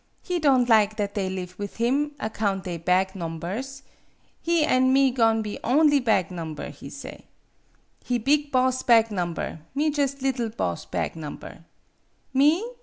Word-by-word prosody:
He 360 Hz, -1 st, -2 dB
don' 270 Hz, -5 st, +4 dB
lig 215 Hz, -3 st, +4 dB
that 205 Hz, -2 st, -2 dB
they 195 Hz, -2 st, -1 dB
live 180 Hz, -1 st, -6 dB
with 205 Hz, -1 st, -5 dB
him, 275 Hz, +6 st, 0 dB
account 205 Hz, -4 st, -2 dB
they 175 Hz, -2 st, -4 dB
bag 185 Hz, +3 st, +1 dB
nombers. 190 Hz, -, -5 dB, 0.6 s
He 335 Hz, -2 st, +2 dB
an' 260 Hz, -2 st, +3 dB
me 270 Hz, 0 st, +4 dB
go'n' 225 Hz, -3 st, +2 dB
be 210 Hz, -1 st, -6 dB
only 290 Hz, +3 st, +4 dB
bag 220 Hz, -9 st, +1 dB
nomber, 160 Hz, -4 st, -6 dB
he -, -, -11 dB
say. -, -, -10 dB, 0.8 s
He 245 Hz, -, 0 dB
big 285 Hz, +5 st, +1 dB
boss 255 Hz, 0 st, +2 dB
bag 230 Hz, -2 st, +4 dB
nom 175 Hz, -4 st, -2 dB
ber, 160 Hz, -, -5 dB, 0.2 s
me 300 Hz, +2 st, +1 dB
jus' 280 Hz, -1 st, -1 dB
liddle 255 Hz, -4 st, 0 dB
boss 90 Hz, -, -3 dB
bag -, -, -3 dB
nomber. 160 Hz, +1 st, -9 dB, 0.7 s
Me 300 Hz, -, +3 dB
230 Hz, 165 wpm, -25 LUFS, 190-275 Hz, 0.8 s, don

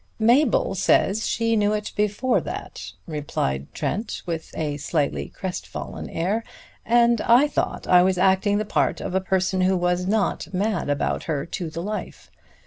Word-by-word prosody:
"Mabel 235 Hz, +1 st, +3 dB
says 195 Hz, +3 st, +2 dB
she 230 Hz, 0 st, +1 dB
knew 210 Hz, -1 st, +2 dB
it 210 Hz, -1 st, -3 dB
before 210 Hz, +5 st, +1 dB
that," -, -, -7 dB
replied 105 Hz, -, -3 dB
Trent 215 Hz, +3 st, -3 dB
with 165 Hz, -2 st, -4 dB
a 150 Hz, -2 st, -2 dB
slightly 145 Hz, 0 st, -1 dB
crestfallen 185 Hz, -1 st, -6 dB
air. 200 Hz, +7 st, -1 dB, 0.4 s
"And 235 Hz, 0 st, +3 dB
I 245 Hz, +5 st, +5 dB
thought 290 Hz, -, -2 dB
I 180 Hz, -1 st, +7 dB
was 185 Hz, 0 st, +2 dB
acting 190 Hz, +2 st, +3 dB
the 215 Hz, -, -1 dB
part -, -, 0 dB
of -, -, -5 dB
a 190 Hz, -, +2 dB
person 190 Hz, 0 st, 0 dB
who 185 Hz, 0 st, +3 dB
was 180 Hz, +1 st, 0 dB
not 195 Hz, -5 st, 0 dB
mad 195 Hz, -3 st, -1 dB
about 145 Hz, 0 st, -1 dB
her 150 Hz, -4 st, -2 dB
to 170 Hz, 0 st, -5 dB
the 165 Hz, +2 st, -5 dB
life. 210 Hz, +2 st, -6 dB
190 Hz, 160 wpm, -24 LUFS, 175-215 Hz, 0.4 s, I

